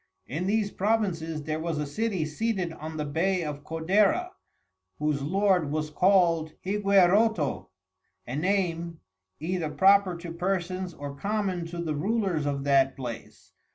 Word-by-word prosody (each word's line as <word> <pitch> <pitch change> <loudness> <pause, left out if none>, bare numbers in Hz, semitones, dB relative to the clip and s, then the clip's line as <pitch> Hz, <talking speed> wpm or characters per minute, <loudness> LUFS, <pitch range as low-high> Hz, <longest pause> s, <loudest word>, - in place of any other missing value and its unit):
In 165 +8 -3
these 210 0 +1
Provinces, 185 -7 -1
there 155 +1 -2
was 165 -1 -2
a 150 - -1
City 185 +2 -1
seated 185 +1 -2
on 160 0 -7
the 150 - -2
Bay 175 +5 0
of 145 -2 -5
Codera, 195 - +1 0.7
whose 150 -2 0
Lord 185 0 +2
was 155 +1 -2
call'd 170 -3 +3
Higueroto, 195 -3 +3 0.6
a 125 - -5
Name, 170 -1 -1 0.4
either 165 0 -2
proper 190 +1 +4
to 170 -1 -7
Persons 185 0 -2
or 145 -1 -6
common 195 0 -2
to 170 +1 -7
the 165 -3 -2
Rulers 185 -2 0
of 140 -1 -2
that 135 -1 +3
Place. 120 -4 -8
170 Hz, 140 wpm, -27 LUFS, 155-195 Hz, 0.7 s, proper